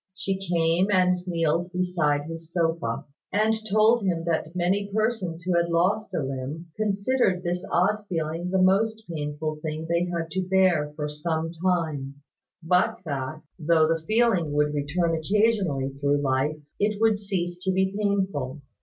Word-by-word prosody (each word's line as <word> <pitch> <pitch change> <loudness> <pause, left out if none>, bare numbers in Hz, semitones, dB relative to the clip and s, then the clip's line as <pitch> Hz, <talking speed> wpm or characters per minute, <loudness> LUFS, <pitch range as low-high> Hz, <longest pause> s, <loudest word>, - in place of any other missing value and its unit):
She 190 0 -2
came 170 0 +1
and 180 -2 +3
kneeled 170 0 0
beside 175 -5 +1
his 165 +1 -8
sofa, 165 -9 -1 0.3
and 215 +3 +3 0.2
told 220 +3 +5
him 175 -4 0
that 165 0 -1
many 190 +3 0
persons 205 -6 -1
who 180 0 0
had 170 0 +2
lost 185 +4 +1
a 160 - 0
limb 135 +5 -5
considered 205 -2 +1
this 175 +1 -2
odd 205 +4 +2
feeling 165 0 -2
the 190 +1 +1
most 220 +4 +2
painful 155 -1 -3
thing 155 +1 -4
they 170 +1 +1
had 165 -2 -3
to 190 - 0
bear 185 -6 +3
for 150 -1 -3
some 160 +2 -2
time; 165 -6 -1 0.5
but 180 +2 +2
that, 145 +1 -4 0.2
though 160 0 +4
the 165 0 0
feeling 215 -9 +2
would 150 0 +2
return 160 +4 0
occasionally 185 -5 +1
through 145 0 +2
life, 140 +2 0 0.2
it 210 0 +1
would 220 -2 +3
cease 180 -4 -3
to 190 - +1
be 190 +1 +1
painful. 190 -10 -1
170 Hz, 155 wpm, -26 LUFS, 155-190 Hz, 0.5 s, told